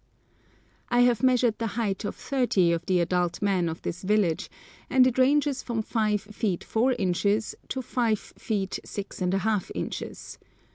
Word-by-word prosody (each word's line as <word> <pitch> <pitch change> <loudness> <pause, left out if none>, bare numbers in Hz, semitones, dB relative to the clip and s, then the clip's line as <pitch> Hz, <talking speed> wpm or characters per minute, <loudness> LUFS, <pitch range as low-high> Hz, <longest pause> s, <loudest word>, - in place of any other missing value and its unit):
I 245 0 +4
have 245 -3 +4
measured 250 -3 +3
the 230 - -1
height 205 -3 -1
of 205 - -3
thirty 240 -10 +1
of 170 0 -1
the 185 -1 +3
adult 175 0 0
men 190 -4 +1
of 160 - -7
this 175 - -4
village, 195 -4 +1 0.4
and 260 -1 +5
it 255 0 +1
ranges 280 0 +3
from 230 -3 -2
5 215 -2 0
feet 210 -3 -3
4 245 +4 +1
inches 205 +1 0 0.2
to 260 - -3
5 230 -2 +1 0.2
feet 200 -4 -2
6½ 195 +1 -2
inches. - - -6
215 Hz, 150 wpm, -27 LUFS, 185-245 Hz, 0.4 s, and